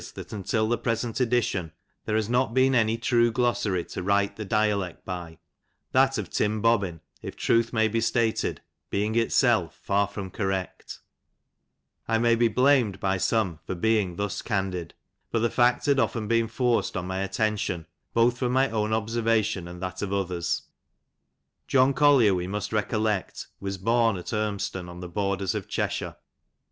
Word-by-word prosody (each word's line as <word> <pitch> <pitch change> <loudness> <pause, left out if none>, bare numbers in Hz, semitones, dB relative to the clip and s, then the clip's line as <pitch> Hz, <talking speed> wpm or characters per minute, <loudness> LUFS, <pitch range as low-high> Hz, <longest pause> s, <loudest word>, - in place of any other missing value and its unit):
that - - -8
ontil 110 +2 -1
the 120 0 0
present 115 0 -2
edition, 115 -9 0 0.3
there 110 - -1
haj 110 -1 +1
^ot 125 0 +1
teec 130 0 +4
anj 115 -2 +2
true 120 0 +3
glossary 115 -7 0
to - - -6
ffrila 100 +1 +1
the 110 - -5
dialect 100 -4 0
by, 85 -3 -6 0.5
that - - +3
ot - - -5
Tim 105 +1 0
Bobbin, 100 -7 +1 0.2
if - - -7
tnilh 115 0 +2
may 110 -2 +2
be 115 +1 0
•tated, 115 0 0 0.3
being 105 +2 0
itself 115 0 +2
far 100 0 +2
from 100 -2 -7
correct 95 -2 -4 1.1
I 115 - +2
may 115 0 +3
beblamed 120 -2 +3
bj 95 -1 -1
some, 95 -9 0
&r 95 - -1
being 100 -2 +1
thiu 100 -1 -3
candid, 95 -5 -2 0.4
bat 115 -1 0
the 120 - +3
&ct 120 0 +2
had 140 -2 +3
often 115 -2 0
been 115 0 +2
forced 120 +1 0
on 90 - -3
my 95 +1 -3
attention, 100 -4 -1 0.3
both 120 +1 +3
fiwm 125 - 0
my 130 0 +2
own 105 -1 0
obaemtion 110 -4 0
and 90 0 -9
tliat 90 0 -5
of 100 -2 -3
others. 90 -4 -1 1.0
John 135 +1 +4
Collier, 135 -8 +5
we 90 -1 -2
mnst 105 +3 -4
recollect, 105 -2 -1
nas 100 0 -3
bom 115 +1 +2
at 90 - -7
Unnston, 100 -4 -2
on 85 0 -9
the 90 - -6
borders 100 +1 -1
of - - -4
Cheshire. - - -2
110 Hz, 165 wpm, -26 LUFS, 95-115 Hz, 1.1 s, Collier